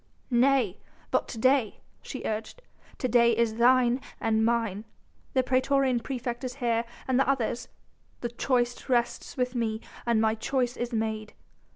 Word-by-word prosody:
"Nay! 245 -5 +3 0.3
but - - +1
to 235 - -7
day," 255 -2 +2 0.2
she - - -7
urged, 220 - -4 0.3
"to 255 - -1
day 235 -1 +4
is 230 -1 +1
thine 250 +1 +4 0.2
and 220 -1 +1
mine.... 225 -3 0 0.5
The 260 - +4
praetorian 260 0 +2
praefect 240 0 -4
is 255 0 -4
here 235 -3 0 0.2
and 260 0 +2
the 270 - +3
others... 245 -3 0 0.5
the 240 - -2
choice 245 +1 -1
rests 240 +2 0
with 250 0 0
me 225 -3 -1 0.3
and 235 -2 +3
my 220 0 +3
choice 245 +2 -1
is 240 0 -3
made.... 220 -1 -2
240 Hz, 155 wpm, -28 LUFS, 225-255 Hz, 0.5 s, day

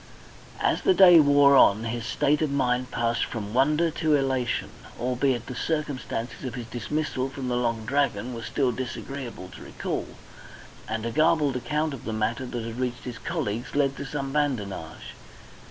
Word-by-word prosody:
As - - +1
the 380 - +3
day 180 -3 +9
wore 145 -1 +6
on 110 -4 +6
his 115 0 -3
state 145 +4 +1
of 155 - +1
mind 125 -2 0
passed 115 0 0
from 105 -3 -5
wonder 150 +6 +3
to 155 -1 +1
elation, 130 -3 0 0.3
albeit 125 0 0
the 130 - -6
circumstances 140 -6 -3
of 130 -2 -4
his 120 -2 -5
dismissal 130 +3 -2
from 130 -1 -5
the 125 - 0
Long 115 -2 -1
Dragon 125 -3 0
were 115 - -6
still 130 +3 0
disagreeable 125 -4 -6
to - - -12
recall, - - -4 0.8
and 110 0 -3
a 115 - -2
garbled 155 -1 +3
account 150 +4 -1
of 135 - -9
the 110 - -3
matter 115 +4 -1
that 120 -2 -4
had 115 +1 -6
reached 125 -1 -2
his 120 -2 -7
colleagues 125 -9 -3
led 140 -1 +2
to - - -4
some 135 0 -4
badinage. 105 - -3
130 Hz, 170 wpm, -26 LUFS, 115-145 Hz, 0.8 s, day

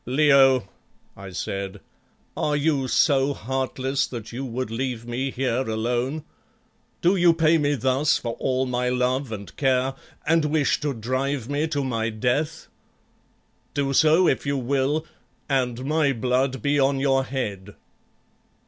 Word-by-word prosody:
"Leo," 135 -3 +4 0.5
I 95 0 -9
said, 95 +2 -4 0.6
"are 150 - 0
you 145 -2 +1
so 140 +1 +3
heartless 130 +2 -2
that 115 -4 -7
you 125 +3 -5
would 130 -2 -4
leave 120 -1 -3
me 125 +3 -2
here 130 -2 -1
alone? 120 +7 -1 0.8
Do 180 +3 +4
you 175 -2 +4
pay 165 0 +3
me 145 -1 +1
thus 130 +3 +2
for 115 -1 -4
all 130 0 0
my 125 0 -1
love 125 +1 0
and 100 -2 -7
care, 130 -1 +1 0.3
and 160 0 +3
wish 150 -1 +1
to 145 -3 -2
drive 130 +3 -2
me 145 +2 0
to 145 -3 -1
my 115 -3 -1
death? 130 +8 -1 1.1
Do 140 -1 0
so 160 +5 +5
if - - +1
you 140 0 -1
will, 140 +4 0 0.4
and 125 -2 -1
my 150 -1 +2
blood 130 +1 0
be 145 0 +2
on 135 0 +2
your 135 -1 +2
head." 105 -7 -5
135 Hz, 145 wpm, -24 LUFS, 125-145 Hz, 1.1 s, so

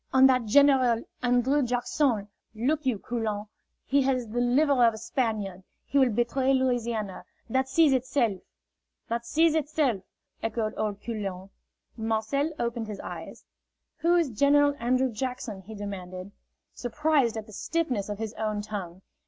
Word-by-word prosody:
"And 265 0 +7
that 255 -3 +2
General 255 -2 +5 0.2
An 245 0 +3
drrew 275 +4 +2
Jack 245 -1 -1
son, 235 -9 +1 0.3
look 275 +6 0
you, 245 -5 +2
Coulon, 215 -2 -3 0.4
he 280 +1 +3
has 255 -3 0
the 240 +3 -1
liver 260 +1 +3
of 230 -2 +4
a - - -8
Spaniard. 220 -6 -2 0.2
He 280 - +1
will 260 -2 +5
betray 255 +4 +1
Louisiana. 235 -6 -1 0.3
That 265 +1 +1
sees 315 -1 +4
itself!" 240 -6 0 0.7
"That 235 +1 -2
sees 325 +3 +3
itself," 295 -8 0 0.4
echoed 225 -1 -2
old 210 -2 -3
Coulon. 195 -4 -5 0.5
Marcel 225 +7 0
opened 235 -3 -2
his 210 -2 -6
eyes. - - -8 0.5
"Who 340 +1 +3
is 335 -6 +2
General 285 +5 +4
Andrew 255 +2 +1
Jackson?" 230 -3 -4
he 215 +4 -10
demanded, 185 -2 -6 0.4
surprised 270 -2 +1
at 220 - -5
the 215 - -14
stiffness 250 -8 -1
of 205 - -3
his 220 0 -4
own 215 -1 -1
tongue. 190 -4 -6
240 Hz, 155 wpm, -27 LUFS, 215-270 Hz, 0.7 s, And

